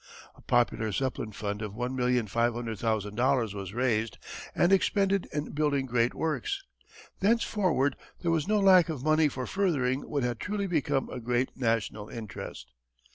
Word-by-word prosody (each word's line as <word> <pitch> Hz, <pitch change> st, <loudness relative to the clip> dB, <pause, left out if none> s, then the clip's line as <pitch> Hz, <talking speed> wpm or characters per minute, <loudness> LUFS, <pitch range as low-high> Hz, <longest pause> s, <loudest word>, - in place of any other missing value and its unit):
A -, -, -19 dB
popular 115 Hz, -2 st, +1 dB
Zeppelin 125 Hz, -2 st, -2 dB
fund 105 Hz, 0 st, -4 dB
of 105 Hz, -2 st, -4 dB
$1,500,000 120 Hz, -1 st, 0 dB
was 100 Hz, -2 st, -6 dB
raised 115 Hz, -3 st, 0 dB, 0.4 s
and 175 Hz, +3 st, +4 dB
expended 195 Hz, 0 st, +2 dB
in 150 Hz, 0 st, -3 dB
building 145 Hz, -2 st, +1 dB
great 120 Hz, -1 st, +1 dB
works. 390 Hz, -, -2 dB, 0.6 s
Thenceforward 190 Hz, -, +2 dB, 0.3 s
there 170 Hz, -, +2 dB
was 160 Hz, -1 st, +1 dB
no 210 Hz, 0 st, +3 dB
lack 185 Hz, -3 st, +6 dB
of 145 Hz, -5 st, -4 dB
money 155 Hz, 0 st, +4 dB
for 130 Hz, -2 st, -4 dB
furthering 140 Hz, -9 st, 0 dB
what 140 Hz, -3 st, -1 dB
had 120 Hz, -2 st, -1 dB
truly 205 Hz, 0 st, -2 dB
become 150 Hz, -6 st, 0 dB
a 125 Hz, -, -5 dB
great 125 Hz, +2 st, 0 dB
national 115 Hz, -3 st, -1 dB
interest. 110 Hz, -, -8 dB
130 Hz, 140 wpm, -29 LUFS, 115-160 Hz, 0.6 s, lack